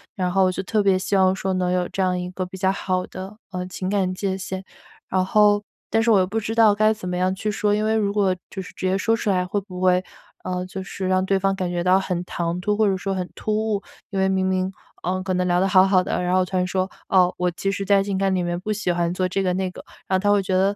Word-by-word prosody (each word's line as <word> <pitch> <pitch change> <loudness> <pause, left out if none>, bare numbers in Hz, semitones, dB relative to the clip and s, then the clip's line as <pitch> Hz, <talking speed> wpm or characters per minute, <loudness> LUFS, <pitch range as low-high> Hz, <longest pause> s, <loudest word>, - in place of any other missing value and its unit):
然 180 -2 -1
后 190 0 +3
就 185 - -3
特 210 +1 +1
别 195 -1 +4
希 200 +1 -1
望 190 0 +4
说 190 0 -2
能 180 -1 0
有 180 -1 0
这 195 - -3
样 180 -1 +1
一 180 0 -4
个 185 0 -3
比 190 +1 -9
较 190 0 +2
好 185 -2 -1
的， 190 +3 -8 0.2
呃， 180 0 -3
情 185 0 -4
感 190 -2 +1
界 190 0 -2
限。 190 0 -5 0.5
然 185 0 +1
后 205 +1 +4 0.3
但 225 - +2
是 230 - +3
我 205 - +6
又 185 - +2
不 220 +3 -1
知 220 +1 -3
道 220 -3 +6
该 215 +1 +3
怎 185 -4 -7
么 180 - -2
样 185 +1 +1
去 210 +3 -3
说， 210 -1 +1
因 210 - 0
为 220 0 +2
如 205 -2 +1
果 195 -3 +2 0.2
就 190 - -5
是 185 - -10
直 - - -5
接 190 - +2
说 225 +3 +2
出 210 - -2
来， 180 -1 +1
会 200 +3 -1
不 185 -2 -9
会， 185 0 +3 0.4
嗯， 180 0 -3
就 190 0 -6
是 190 +1 -5
让 185 0 +2
对 195 0 +2
方 195 0 +1
感 185 -2 -2
觉 175 -1 -2
到 185 +1 +4
很 180 -2 -2
唐 170 0 -2
突， 210 +2 0
或 215 -1 +3
者 195 - +2
说 195 +1 -3
很 180 -1 -3
突 215 - -2
兀， 215 -2 0 0.3
因 195 - -2
为 190 - +3
明 190 0 +1
明， 185 0 0 0.3
呃， 185 +1 -1
可 190 -1 -1
能 180 0 0
聊 175 0 +2
得 190 - +2
好 190 0 +5
好 185 -2 +4
的， 180 - -2
然 180 0 0
后 185 - +4
突 185 0 -3
然 180 - +1
说， 185 +1 -1 0.2
“哦， 180 -2 +4
我 180 0 +1
其 195 +3 -2
实 195 0 -3
在 200 0 +4
情 195 -1 -2
感 195 0 +1
里 180 - 0
面 175 0 -2
不 215 +3 -4
喜 200 -4 -1
欢 170 0 0
做 185 0 0
这 195 +2 -1
个 180 - +1
那 185 0 -1
个，” - - -11 0.2
然 190 - +2
后 - - -1
他 205 0 +3
会 200 -1 +3
觉 185 - -2
得 195 +2 +2
190 Hz, 320 characters per minute, -23 LUFS, 185-200 Hz, 0.5 s, 我